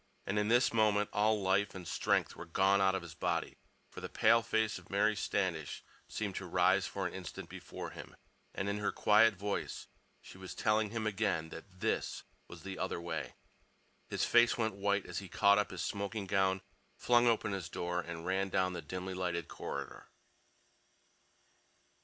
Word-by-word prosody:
And 100 +2 0
in 105 - +1
this 120 +2 +4
moment 105 -2 +3
all 105 +1 +3
life 95 +2 +2
and 90 -2 -7
strength - - +1
were - - -9
gone 95 +3 +3
out 95 0 +4
of 95 - -3
his 85 -2 -9
body, 85 -1 -2 0.3
for - - -9
the - - -5
pale 115 - +4
face 110 -3 0
of 90 - -19
Mary 105 +2 +2
Standish 85 -6 -2 0.2
seemed 105 -3 -3
to 95 - -5
rise 90 +2 +3
for 95 -1 -3
an 90 - -3
instant 90 -4 -7
before - - -7
him, - - -10 0.4
and 95 - -2
in 100 +1 -1
her 105 - 0
quiet 105 +1 +5
voice 100 +2 -3 0.3
she 95 - -13
was 95 -1 -8
telling 105 0 +2
him 115 0 -3
again 85 -6 0
that 90 +3 -12
this - - -1 0.2
was 85 -2 -11
the 95 -1 -6
other 95 - -2
way. 85 0 -4 0.7
His - - 0
face 120 0 +5
went 110 -2 0
white 100 0 0
as - - -4
he 95 -2 -9
caught 100 +1 +5
up 105 - 0
his 90 -2 -4
smoking 100 +1 -3
gown, 95 0 +1 0.4
flung 120 0 +4
open 110 -2 +2
his 95 -3 -4
door, 90 0 -2
and 85 -1 -7
ran 95 +1 0
down 95 0 +1
the 85 - -4
dimly 90 +5 -5
lighted 90 -3 -2
corridor. - - -6
95 Hz, 180 wpm, -33 LUFS, 90-105 Hz, 0.7 s, quiet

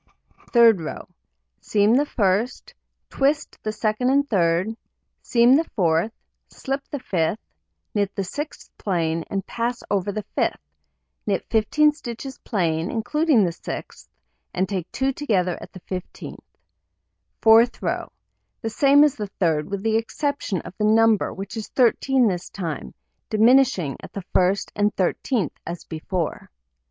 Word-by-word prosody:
Third 230 -6 +6
row: 155 - -6 0.5
Seam 210 +1 +2
the 290 +3 +2
1st, 210 +1 0 0.4
twist 285 +2 0
the 215 - -3
2d 215 +3 0
and 285 +1 +3
3d, 180 +2 +1 0.5
seam 240 +1 +4
the 320 +3 +1
4th, 170 +1 +2 0.4
slip 275 0 -4
the 290 - -3
5th, 185 - -1 0.6
knit 200 -1 -1
the 195 - -1
6th 290 - -6
plain, 165 -4 -1
and 195 -1 -3
pass 235 +1 -3
over 200 0 0
the 210 +1 -5
5th; - - +1 0.7
knit - - 0
15 300 +8 +4
stitches 265 -2 -8
plain, 165 -5 -1
including 290 +1 +2
the 175 - +1
6th, - - -8 0.5
and 185 +1 +1
take 185 -4 -4
2 270 +1 0
together 190 -11 0
at - - -10
the 185 - -12
15th. 185 0 -7 1.0
Fourth 225 +2 +5
row: - - -3 0.5
The 225 - -3
same 280 +5 +5
as 300 -3 +4
the 210 -6 -5
3d, 160 -5 +2
with 200 0 -4
the 220 0 +2
exception 225 - -2
of - - -11
the - - 0
number, 220 0 +4
which 195 +3 -7
is 220 -2 -5
13 255 0 +3
this 180 -3 -2
time, 160 - -5 0.3
diminishing 220 - +3
at - - -11
the 200 - -5
first 185 +2 +2
and 205 0 +2
thirteenth 190 - 0
as 170 0 -5
before. 165 +1 -4
215 Hz, 145 wpm, -23 LUFS, 185-250 Hz, 1.0 s, Third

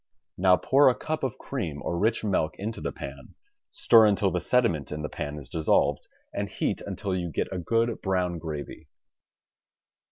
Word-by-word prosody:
Now 90 0 +4
pour 135 +8 +5
a 125 - +1
cup 155 -1 -4
of 130 -1 -2
cream 90 - -4
or - - -2
rich 110 +7 +1
milk 95 -7 0
into 110 +4 -5
the - - -2
pan, - - -9 0.3
stir 115 -2 +5
until 100 -1 +2
the 90 - -1
sediment 90 - +1
in 75 0 -4
the 75 - -3
pan 75 +1 -5
is 70 -4 -8
dissolved, 80 +3 +1 0.3
and - - -3
heat - - -2
until 95 -2 -3
you 90 -2 -2
get 80 - -3
a 95 - -3
good 115 +5 0
brown 90 -3 0
gravy. 75 -3 -7
95 Hz, 180 wpm, -27 LUFS, 80-115 Hz, 0.3 s, pour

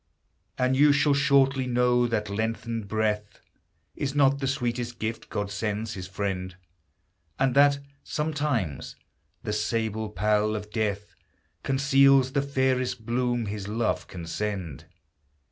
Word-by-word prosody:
And 130 +1 +2
you 145 +2 +6
shall 145 +1 +3
shortly 140 -2 +3
know 125 0 +3
that 110 -2 -1
lengthened 110 +1 -3
breath 105 -1 -1 0.6
Is 140 0 -3
not 140 -1 +4
the 135 - -1
sweetest 120 -3 -2
gift 110 0 -4
God 100 -1 -3
sends 105 +1 -3
his 90 -2 -6
friend, 95 -1 -3 0.8
And 135 -1 +2
that, 140 +1 +5 0.3
sometimes, 145 - -2 0.5
the 105 - -2
sable 110 0 -1
pall 105 0 +1
of 105 0 -6
death 105 -2 -2 0.5
Conceals 135 -1 +4
the 140 0 +1
fairest 130 -3 0
bloom 120 0 0
his 100 -1 -5
love 110 +2 -1
can 85 -3 -8
send. 95 -5 -4
115 Hz, 130 wpm, -26 LUFS, 105-135 Hz, 0.8 s, you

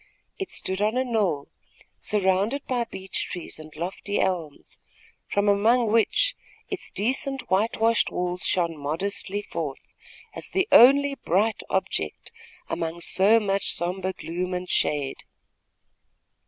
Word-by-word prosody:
It 390 - -3
stood 190 +1 -3
on 215 +4 +1
a 260 - +2
knoll, 205 - 0 0.5
surrounded 205 +6 +1
by 245 -2 -1
beech 190 -4 -4
trees 175 -2 -7
and 155 0 -11
lofty 185 +5 -3
elms, 170 -6 -3 0.5
from 205 0 0
among 220 +3 +3
which 230 - +3 0.3
its 390 -3 -4
decent 265 +4 -1
whitewashed 225 +3 +2
walls 180 0 -3
shone 170 -3 +1
modestly 190 +7 -2
forth, 155 -8 -5 0.5
as - - -6
the 380 -1 +1
only 280 +3 +7
bright 215 -3 0
object 80 - -2 0.4
among 165 +1 -3
so 200 +6 +5
much 200 -2 0
sombre 185 +2 0
gloom 180 +1 -4
and 180 0 -4
shade. 145 -2 0
195 Hz, 125 wpm, -25 LUFS, 175-230 Hz, 0.5 s, only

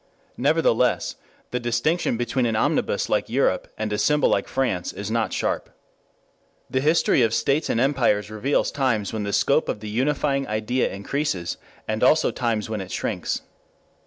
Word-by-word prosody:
Nevertheless 125 -4 +2 0.4
the 125 - -1
distinction 120 +4 0
between 120 +1 0
an 115 - 0
omnibus 110 - +1
like - - 0
Europe - - +1
and 110 -1 -2
a 105 - -1
symbol 150 +8 +3
like - - +1
France 110 -10 -1
is 100 +1 -6
not 115 -1 0
sharp. - - -2 1.0
The 130 - +1
history 155 -2 +3
of 115 -1 +2
states 145 +3 +1
and 115 - +1
empires 120 -6 +2
reveals 120 +7 0
times 115 -7 0
when 110 -2 -2
the 100 - -2
scope 140 +8 +2
of - - -2
the 105 0 -7
unifying 135 +3 0
idea 110 +4 0
increases 100 - -2 0.3
and 110 0 -2
also 155 +5 +4
times 115 -4 -1
when 110 -2 -3
it 95 - -8
shrinks. - - -2
120 Hz, 160 wpm, -24 LUFS, 110-140 Hz, 1.0 s, also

